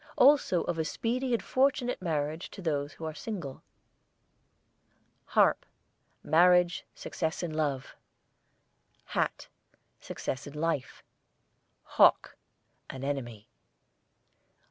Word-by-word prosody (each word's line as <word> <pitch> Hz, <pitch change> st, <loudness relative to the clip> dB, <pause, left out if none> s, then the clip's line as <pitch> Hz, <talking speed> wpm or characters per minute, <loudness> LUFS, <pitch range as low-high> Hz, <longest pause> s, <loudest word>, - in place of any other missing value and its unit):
Also 260 Hz, -, +5 dB
of 170 Hz, -2 st, -3 dB
a -, -, +2 dB
speedy 245 Hz, +10 st, -2 dB
and 235 Hz, -, +1 dB
fortunate 255 Hz, -3 st, +1 dB
marriage 155 Hz, -1 st, -2 dB
to -, -, -12 dB
those 145 Hz, -5 st, -2 dB
who 160 Hz, -, -8 dB
are 160 Hz, -, -4 dB
single. 170 Hz, -8 st, -6 dB, 1.6 s
HARP, -, -, +3 dB, 0.6 s
marriage, 180 Hz, +1 st, +4 dB
success 160 Hz, 0 st, -3 dB
in 165 Hz, -3 st, -3 dB
love. 145 Hz, -4 st, -2 dB, 1.1 s
HAT, -, -, -2 dB, 0.5 s
success 130 Hz, +2 st, -5 dB
in 145 Hz, -, -10 dB
life. 150 Hz, -4 st, -2 dB, 0.8 s
HAWK, -, -, +4 dB, 0.5 s
an 135 Hz, 0 st, -7 dB
enemy. 120 Hz, -7 st, -4 dB
160 Hz, 100 wpm, -29 LUFS, 145-185 Hz, 1.6 s, Also